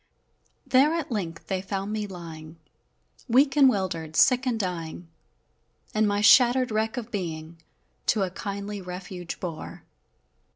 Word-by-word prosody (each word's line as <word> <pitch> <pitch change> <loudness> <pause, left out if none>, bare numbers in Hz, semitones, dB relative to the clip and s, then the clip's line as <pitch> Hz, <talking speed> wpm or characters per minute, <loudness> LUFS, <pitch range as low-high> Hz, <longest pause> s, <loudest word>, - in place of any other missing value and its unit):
There 270 +4 +4
at 325 -6 -3
length 170 -7 -4
they 190 -2 -2
found 195 +1 -4
me 210 -1 -2
lying, 165 -3 -9 0.7
Weak 270 +4 +4
and 275 -3 +7
'wildered, 170 -7 -2
sick 255 +5 +4
and 235 -3 0
dying, 175 -3 -4 0.9
And 215 0 +2
my 205 0 +1
shattered 250 +3 +6
wreck 220 +3 -1
of 240 -1 -5
being 165 -4 -5 0.5
To 210 -4 +3
a 185 - -2
kindly 200 +1 -5
refuge 180 -1 -7
bore! 170 -4 -7
200 Hz, 135 wpm, -26 LUFS, 175-235 Hz, 0.9 s, and